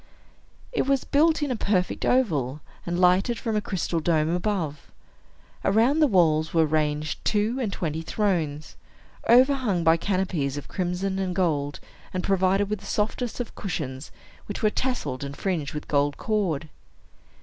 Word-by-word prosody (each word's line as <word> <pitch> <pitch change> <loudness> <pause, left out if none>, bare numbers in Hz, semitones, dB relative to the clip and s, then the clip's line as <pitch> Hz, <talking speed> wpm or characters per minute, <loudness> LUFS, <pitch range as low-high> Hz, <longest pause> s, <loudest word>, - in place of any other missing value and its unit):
It 445 - 0
was 275 -1 +2
built 310 +2 +3
in 285 - -1
a - - 0
perfect 195 -4 0
oval, 150 - +1 0.3
and 175 +1 -1
lighted 185 +6 +3
from 225 -2 -2
a 210 - +1
crystal 180 -4 -2
dome 155 -1 +1
above. 175 -7 -3 0.7
Around 230 +9 +3
the 305 - +5
walls 160 - +2
were 165 -1 +5
ranged 150 0 -1
two 215 +4 +1
and 220 -5 -1
twenty 160 -4 -3
thrones, 165 -5 -2 0.5
overhung 250 -7 +4
by 165 0 +5
canopies 175 -7 -1
of 145 - -7
crimson 190 +1 -2
and 185 -2 -2
gold, 150 -6 0 0.4
and 185 - -1
provided 195 +1 +2
with 210 0 -2
the - - -13
softest 225 +4 -2
of 245 - -4
cushions, 140 -8 -5 0.4
which 205 - -5
were 215 - +4
tasselled 155 - -2
and 140 0 -6
fringed 165 -7 -2
with 150 - -5
gold 145 0 +1
cord. 180 -9 -1
185 Hz, 155 wpm, -25 LUFS, 155-215 Hz, 0.7 s, the